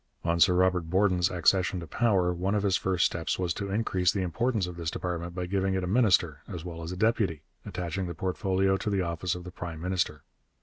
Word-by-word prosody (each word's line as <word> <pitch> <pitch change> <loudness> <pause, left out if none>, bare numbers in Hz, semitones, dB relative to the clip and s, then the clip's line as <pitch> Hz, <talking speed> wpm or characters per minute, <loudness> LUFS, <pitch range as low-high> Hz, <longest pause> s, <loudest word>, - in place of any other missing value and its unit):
On 85 0 +1
Sir 90 +1 +6
Robert 90 -2 +2
Borden's 95 -1 +3
accession 90 +2 +2
to 85 - -6
power 95 -2 +2
one 95 +4 -1
of 105 - 0
his 100 -2 +2
first 95 -1 +1
steps 80 -1 -1
was 90 -2 -1
to 100 +2 -4
increase 95 -4 +1
the 100 -3 -1
importance 110 +3 0
of 90 -1 -7
this 85 -2 -3
department 85 0 -4
by 90 -1 -2
giving 95 +1 0
it 95 - -1
a - - -2
minister 90 - +3
as 90 -3 -7
well 85 -2 -6
as 80 +1 -5
a 90 - -5
deputy, 100 -7 +1 0.2
attaching 90 +1 -3
the 85 - -5
portfolio 95 +2 +1
to 105 - -3
the 100 -2 +1
office 85 +1 -2
of 90 - -7
the 90 - -8
prime 85 -3 -6
minister. 90 -4 -1
90 Hz, 225 wpm, -28 LUFS, 85-95 Hz, 0.2 s, Sir